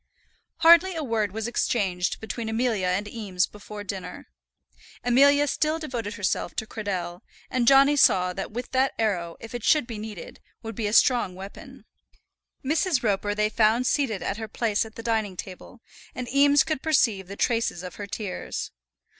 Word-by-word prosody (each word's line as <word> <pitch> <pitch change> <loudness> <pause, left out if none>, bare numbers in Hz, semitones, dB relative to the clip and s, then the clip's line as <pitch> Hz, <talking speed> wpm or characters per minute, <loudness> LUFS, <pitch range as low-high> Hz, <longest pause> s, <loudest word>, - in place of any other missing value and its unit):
Hardly 340 +2 +6
a 320 - -3
word 220 -6 -1
was 220 +2 -4
exchanged 195 -7 -1
between 220 +1 -5
Amelia 220 -4 0
and 190 +3 -1
Eames 200 -5 -1
before 210 0 -10
dinner. 190 -2 -7 0.7
Amelia 280 +4 +5
still 310 +2 0
devoted 240 -9 -5
herself 190 -4 -2
to 220 - -2
Cradell, 185 -5 -4 0.3
and 250 -2 0
Johnny 275 +2 +6
saw 180 -9 +4
that 195 +3 -5 0.2
that 265 +1 +1
arrow, 180 -7 -1
if 225 - -10
it 240 -2 -5
should 300 0 +3
be 230 -3 -7
needed, 210 -5 -8 0.2
would 225 0 -6
be 220 0 -2
a - - -2
strong 235 -6 +3
weapon. 195 +2 -11 0.8
Mrs. 305 -1 +1
Roper 205 -1 0
they 210 0 +2
found 220 +3 +2
seated 255 -8 0
at 195 - -2
her 220 0 -5
place 220 0 0
at 220 - -13
the 230 - -8
dining 220 -5 -1
table, 190 +6 -9 0.3
and 250 -1 -5
Eames 285 +1 +5
could 310 -4 -3
perceive 225 - +1
the 200 - -8
traces 230 -6 0
of 180 -1 -8
her 205 - -6
tears. 200 -1 -5
220 Hz, 170 wpm, -25 LUFS, 200-255 Hz, 0.8 s, Hardly